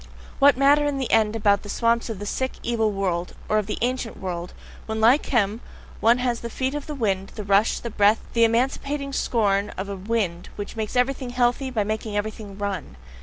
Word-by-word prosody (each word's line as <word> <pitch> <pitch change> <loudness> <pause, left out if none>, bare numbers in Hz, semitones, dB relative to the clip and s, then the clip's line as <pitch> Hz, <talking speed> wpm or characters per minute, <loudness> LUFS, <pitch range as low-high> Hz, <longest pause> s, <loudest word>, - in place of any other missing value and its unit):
What 280 -1 +6
matter 290 +2 +4
in 285 -1 -1
the 265 -2 -2
end 220 -1 +3
about 205 -2 +3
the 205 - -10
swamps 235 +2 +1
of 225 - -4
the 205 - -6
sick, 260 +5 -2
evil 225 -2 +1
world, 180 -3 -2
or 215 - +2
of 205 - -4
the 210 - -3
"ancient 250 -2 -2
world," 175 -2 -5 0.4
when 220 0 -2
like 240 +7 +4
him, 220 -2 +1 0.4
one 230 +2 +4
has 245 -2 -1
the 235 - -6
feet 260 +3 -2
of 295 0 -5
a 300 - -3
wind, 195 -6 -1
the 210 - -5
rush, 200 +2 +3
the 235 - -6
breath, 210 +1 +3
the 230 - +4
emancipating 275 +4 0
scorn 205 -6 +1
of 195 +2 -4
a 200 - -3
wind, 195 -3 -2
which 205 +2 -6
makes 220 0 -4
everything 255 0 +1
healthy, 245 +2 +1
by 225 -5 0
making 215 0 -3
everything 205 -1 -5
RUN! 195 - -4
225 Hz, 210 wpm, -24 LUFS, 200-250 Hz, 0.4 s, What